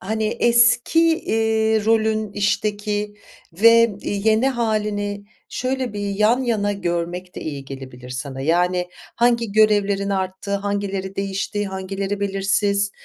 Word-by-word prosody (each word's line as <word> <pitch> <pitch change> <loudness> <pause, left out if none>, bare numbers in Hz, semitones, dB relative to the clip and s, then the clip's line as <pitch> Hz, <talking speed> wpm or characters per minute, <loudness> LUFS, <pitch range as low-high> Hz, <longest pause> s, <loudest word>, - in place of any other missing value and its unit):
hani, 220 +3 -2
eski, 240 +6 +3 0.2
iii, 220 -1 +1
rolün 220 -1 +1
işteki 205 0 -1 0.4
ve, 230 +3 +5
i 200 -1 -3
yeni 220 +4 +3
hâlini 210 -4 -2 0.2
şöyle 255 -2 -2
bir 205 - -5
yan 215 +6 +2
yana 210 -4 0
görmek 180 -1 -3
de - - -7
iyi 145 -3 -5
gelebilir 130 -2 -10
sana. 130 +1 -5
Yani, 180 +4 +1 0.3
hangi 235 -2 +1
görevlerin 205 -2 +2
arttığı, 190 +1 -2
hangileri 200 -1 -3
değişti, 195 +1 -2
hangileri 195 +1 -4
belirsiz? 200 0 0
205 Hz, 120 wpm, -21 LUFS, 190-220 Hz, 0.4 s, ve